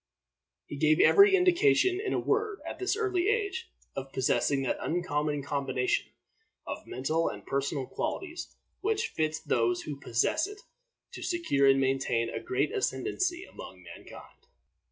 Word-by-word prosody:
He 145 - -7
gave 155 +2 +3
every 400 -1 +7
indication, 370 +1 +3
in 405 - -2
a - - +1
word, 425 -1 0
at - - -6
this 380 +2 0
early 380 -4 0
age, 420 0 -1 0.3
of 135 0 -5
possessing 135 +1 +1
that 130 - -1
uncommon 150 -4 -1
combination 135 -3 -1 0.6
of - - -6
mental 155 +6 0
and - - -9
personal 140 0 -1
qualities 350 - -5 0.2
which 425 +1 0
fits 155 0 -1
those 120 0 0
who 145 -2 -6
possess 140 - +1
it 415 0 -11 0.5
to - - -9
secure 330 - +1
and 135 0 +5
maintain 130 -3 0
a - - -3
great 385 +3 -1
ascendency 370 -3 -1
among - - -11
mankind. 465 - -13
175 Hz, 145 wpm, -29 LUFS, -, 0.6 s, every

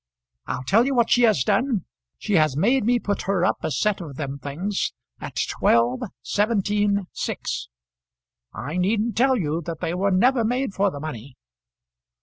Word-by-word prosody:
I'll 125 - -3
tell 225 - +3
you 275 - 0
what 235 -2 +2
she 245 - +5
has 160 -13 +1
done; 215 - +1 0.3
she 210 - -3
has 155 -6 +3
made 240 - +3
me 245 +1 +3
put 205 -3 -2
her 185 -3 +2
up - - +1
a - - -2
set 195 +8 0
of 150 -5 -8
them 140 -1 -5
things 170 +9 -3 0.3
at - - -8
twelve, 120 +2 +2 0.2
seventeen, 205 - +1
six! - - -4 0.8
I 155 +7 -5
needn't 210 +4 +1
tell 260 +3 +4
you 160 -4 -1
that 165 -2 -4
they 165 -1 -2
were 195 +3 +1
never 235 +6 +3
made 250 0 -1
for 200 +1 +2
the 145 - -7
money." 140 -4 -7
195 Hz, 170 wpm, -23 LUFS, 155-220 Hz, 0.8 s, she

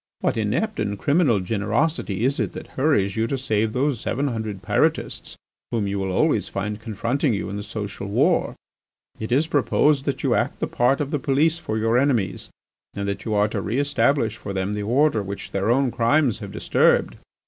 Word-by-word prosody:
What - - +1
inept 120 - -1
and 100 0 -1
criminal 140 - +2
generosity 110 - -1
is 135 +2 +1
it - - -1
that - - -8
hurries 115 -9 +1
you 110 +1 0
to 135 - -1
save 110 -4 0
those 130 0 0
seven 140 +4 -1
hundred 110 -5 -4
Pyrotists - - 0 0.3
whom 115 -3 -1
you 100 0 -2
will 95 -1 -2
always - - +1
find 105 +2 -3
confronting 115 +4 -1
you 100 - -4
in - - -4
the 105 - -4
social 100 -1 -6
war? 100 - +2 0.6
"It 110 +2 -5
is 140 +6 +3
proposed 145 -1 +2
that 140 - -2
you - - +2
act - - 0
the - - 0
part 125 +4 +1
of 145 0 -3
the 150 - 0
police 150 +5 +2
for 110 -9 -3
your 115 +2 +2
enemies, 125 -9 0 0.5
and 100 0 -3
that 100 - -4
you 110 -2 -1
are 105 0 +3
to - - -3
re 110 +5 -2
establish 140 -5 +1
for 100 - -6
them 95 +1 -2
the 105 - -3
order 125 +3 +2
which 100 0 -7
their 100 +2 -1
own 130 +1 +3
crimes 120 +1 +2
have 100 -2 -7
disturbed. - - +2
115 Hz, 200 wpm, -23 LUFS, 105-140 Hz, 0.6 s, is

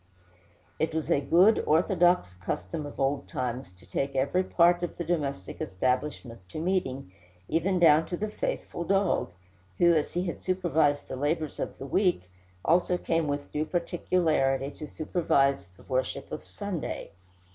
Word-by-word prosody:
It 160 0 0
was 160 - -1
a 140 - +3
good 180 +10 +5
orthodox 175 - +3
custom 90 - -4
of 145 - -11
old 135 +1 0
times 125 -5 -3
to 90 +1 -20
take 140 0 -2
every 140 +8 +2
part 175 -1 +4
of 175 - -4
the 175 - -2
domestic 145 - -3
establishment 125 +3 -2
to - - -8
meeting, 155 - -1 0.4
even 175 +4 +1
down 165 -2 +5
to 175 - -3
the 215 - -2
faithful 355 - -3
dog, 195 - +1 0.5
who, 170 0 +5
as 155 -2 0
he 175 - +1
had 175 - -4
supervised 160 -6 +1
the - - -5
labors 150 +3 -1
of - - -4
the 135 - -7
week, 180 - +2 0.4
also 180 +2 +3
came 165 -2 0
with 145 0 -3
due 150 - 0
particularity 155 -5 0
to 150 - -8
supervise 140 - +1
the - - -17
worship 130 -1 -2
of - - -6
Sunday. - - -5
155 Hz, 155 wpm, -28 LUFS, 135-175 Hz, 0.5 s, good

